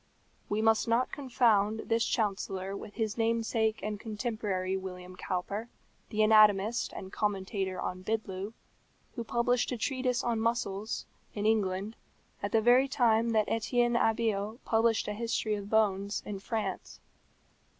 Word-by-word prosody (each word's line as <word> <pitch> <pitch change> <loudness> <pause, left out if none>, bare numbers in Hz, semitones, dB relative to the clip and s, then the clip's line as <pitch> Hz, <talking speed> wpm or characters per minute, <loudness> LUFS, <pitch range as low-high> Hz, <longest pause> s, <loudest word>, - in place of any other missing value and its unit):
We 210 +1 0
must 225 +1 +3
not 235 +2 +2
confound 225 -6 +2
this 230 0 +1
chancellor 195 -3 -1
with 205 +1 -9
his 220 -1 -2
namesake 225 -1 +1
and 210 -1 -3
contemporary 210 -4 -2
William 185 -1 -7
Cowper, 200 +5 -3 0.4
the 215 -1 +2
anatomist 215 0 +5
and 190 0 -8
commentator 195 -2 -2
on 185 0 -4
Bidloo, 200 -1 -3 0.6
who 235 - -4
published 240 +2 +1
a 250 - -2
treatise 255 0 0
on 235 -2 0
muscles, 220 -2 -1 0.3
in 205 0 -2
England, 205 -1 0 0.4
at 205 - -2
the 225 - +3
very 245 +4 +5
time 235 -3 +3
that 215 -1 +3
Etienne 240 +1 +1
Abeille 220 -2 +1
published 225 0 +2
a 210 - -2
history 225 0 -1
of 205 -1 -4
bones, 205 -2 +1
in 200 -2 -5
France. 220 +2 -4
220 Hz, 140 wpm, -30 LUFS, 200-230 Hz, 0.6 s, anatomist